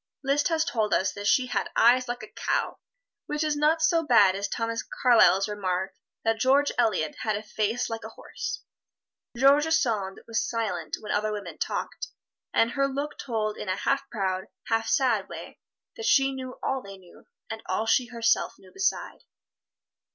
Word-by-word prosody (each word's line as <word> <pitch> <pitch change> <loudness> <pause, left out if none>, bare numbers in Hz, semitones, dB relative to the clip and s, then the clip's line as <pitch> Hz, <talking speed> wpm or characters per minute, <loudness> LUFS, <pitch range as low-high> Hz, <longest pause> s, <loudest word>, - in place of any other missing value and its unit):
Liszt 280 +3 +2
has 325 -2 +1
told 220 -9 +1
us 190 - +1
that 205 0 -4
"she 255 - +4
had 250 - -2
eyes 250 +2 +5
like 245 +1 -4
a - - -8
cow," - - -2 0.5
which 300 +1 -1
is 305 -1 0
not 310 +2 +2
so 330 +2 +4
bad 210 -10 +5
as 200 +1 -2
Thomas 230 0 -2
Carlyle's 225 -6 +4
remark 190 -2 -2 0.3
that 225 0 +1
George 275 +4 +3
Eliot 215 -10 +1
had 215 -2 -1
a 210 - -7
face 220 +3 -1
like 225 0 -5
a - - -7
horse. - - -6 0.7
George 280 +4 +5
Sand 220 -11 0
was 225 -1 0
silent 220 -7 -2
when 215 - -5
other 215 +1 0
women 210 -1 -6
talked, - - -3 0.4
and 230 +1 +2
her 275 0 +1
look 280 +2 -4
told 215 -4 -2
in 190 - -5
a 185 - +1
half 275 +7 -1
proud, 190 -4 -2 0.2
half 225 0 +1
sad 250 -9 +2
way - - -9 0.4
that 455 0 -4
she 270 0 +4
knew 255 -1 -7
all 265 -1 -1
they 195 -2 -10
knew, 180 -2 -18 0.3
and 220 0 -5
all 190 +4 -1
she 245 +2 +2
herself 230 -1 +1
knew 190 - -18
beside. 385 0 -2
230 Hz, 180 wpm, -27 LUFS, 210-275 Hz, 0.7 s, eyes